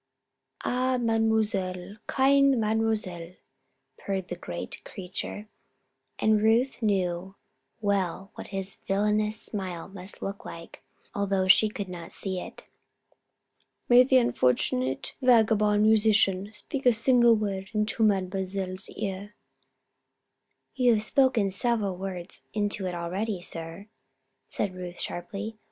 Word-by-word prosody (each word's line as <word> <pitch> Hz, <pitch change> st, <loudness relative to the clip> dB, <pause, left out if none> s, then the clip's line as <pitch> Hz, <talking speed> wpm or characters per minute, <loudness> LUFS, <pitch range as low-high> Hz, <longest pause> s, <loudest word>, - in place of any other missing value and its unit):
"Ah, 255 Hz, +1 st, +1 dB
Mademoiselle! 215 Hz, -5 st, 0 dB
Kind 275 Hz, -1 st, +4 dB
Mademoiselle!" 215 Hz, -6 st, -1 dB, 0.7 s
purred 190 Hz, -2 st, -3 dB
the 175 Hz, -, -3 dB
great 85 Hz, -, -6 dB
creature 195 Hz, +3 st, -6 dB, 0.7 s
and 215 Hz, -1 st, +3 dB
Ruth 235 Hz, +5 st, +2 dB
knew 190 Hz, -3 st, -1 dB, 0.5 s
well 195 Hz, -2 st, -1 dB
what -, -, -9 dB
his 195 Hz, -1 st, -4 dB
villainous 210 Hz, +2 st, +1 dB
smile 185 Hz, -7 st, -5 dB
must 190 Hz, 0 st, -9 dB
look 200 Hz, 0 st, -5 dB
like, 165 Hz, 0 st, -10 dB, 0.3 s
although 195 Hz, -2 st, 0 dB
she 215 Hz, +3 st, +6 dB
could 205 Hz, -2 st, -5 dB
not 175 Hz, -2 st, -8 dB
see 190 Hz, -2 st, -3 dB
it. -, -, -9 dB, 1.3 s
"May 245 Hz, 0 st, +8 dB
the 260 Hz, +1 st, +4 dB
unfortunate 130 Hz, -, +1 dB
vagabond 215 Hz, -4 st, +4 dB
musician 210 Hz, -2 st, +3 dB
speak 255 Hz, +5 st, -3 dB
a 245 Hz, -, +7 dB
single 235 Hz, +1 st, +5 dB
word 195 Hz, -3 st, -3 dB
into 215 Hz, +1 st, -1 dB
Mademoiselle's 190 Hz, -2 st, 0 dB
ear?" 205 Hz, 0 st, -5 dB, 1.4 s
"You 250 Hz, -3 st, +4 dB
have 215 Hz, -1 st, +1 dB
spoken 245 Hz, -5 st, +3 dB
several 210 Hz, -2 st, 0 dB
words 185 Hz, -2 st, -6 dB
into 205 Hz, -2 st, -1 dB
it 180 Hz, -, -4 dB
already, 185 Hz, +4 st, -3 dB
sir," 165 Hz, +2 st, -4 dB, 0.6 s
said 200 Hz, -3 st, -1 dB
Ruth, 180 Hz, -1 st, -7 dB
sharply. 210 Hz, +5 st, -5 dB
205 Hz, 115 wpm, -27 LUFS, 185-220 Hz, 1.4 s, May